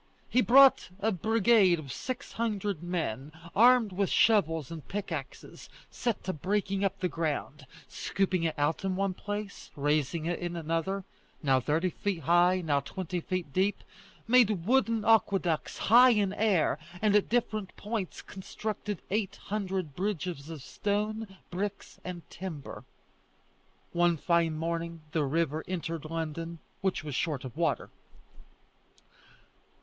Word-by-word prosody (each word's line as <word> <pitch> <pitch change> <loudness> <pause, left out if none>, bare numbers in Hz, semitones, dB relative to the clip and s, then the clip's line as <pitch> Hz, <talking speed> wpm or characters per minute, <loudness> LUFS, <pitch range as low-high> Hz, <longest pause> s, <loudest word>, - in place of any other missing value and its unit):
He 255 - +4
brought 270 -1 +6
a 220 +2 +1
brigade 215 -1 +4
of 140 -5 -7
six 255 -1 -5
hundred 205 -6 -2
men, 155 -6 -3 0.2
armed 235 -1 +6
with 195 +1 0
shovels 165 - +3
and 160 -3 -8
pickaxes; 165 -9 -6 0.2
set 235 -4 -2
to 185 - -2
breaking 195 +4 -1
up 195 - 0
the 185 - +1
ground, 150 -4 -3 0.2
scooping 190 -2 -1
it 160 -2 -1
out 145 +5 0
in 190 -1 0
one 195 0 0
place, 205 +1 -6
raising 150 +2 0
it 170 +1 -1
in 175 -1 -4
another 165 +4 -2 0.4
now 135 -2 +4
thirty 160 +7 0
feet 200 -3 -3
high, 175 +4 +4
now 145 -4 +1
twenty 180 +5 -4
feet 175 -4 -4
deep; 195 +4 +1 0.4
made 220 -7 +4
wooden 230 -2 +2
aqueducts 195 -7 +2
high 245 +4 +7
in 205 -5 +2
air; 195 -9 +2 0.2
and 210 0 +3
at 210 - +3
different 215 -4 -1
points 210 -3 -4
constructed 205 0 -5
eight 205 -1 0
hundred 190 -7 -2
bridges 180 -6 -3
of 155 -5 -7
stone, 210 +2 -2
bricks, 200 +3 -4
and 180 -2 -7
timber. 170 -7 -7 1.1
One 175 -1 +3
fine 165 0 +1
morning 165 0 -3
the 155 -2 +1
river 160 +1 0
entered 165 -3 -4
London, 165 +1 -4 0.2
which 190 -4 0
was 150 -2 -5
short 140 0 -1
of 125 - -8
water. - - -1
185 Hz, 135 wpm, -29 LUFS, 165-205 Hz, 1.1 s, high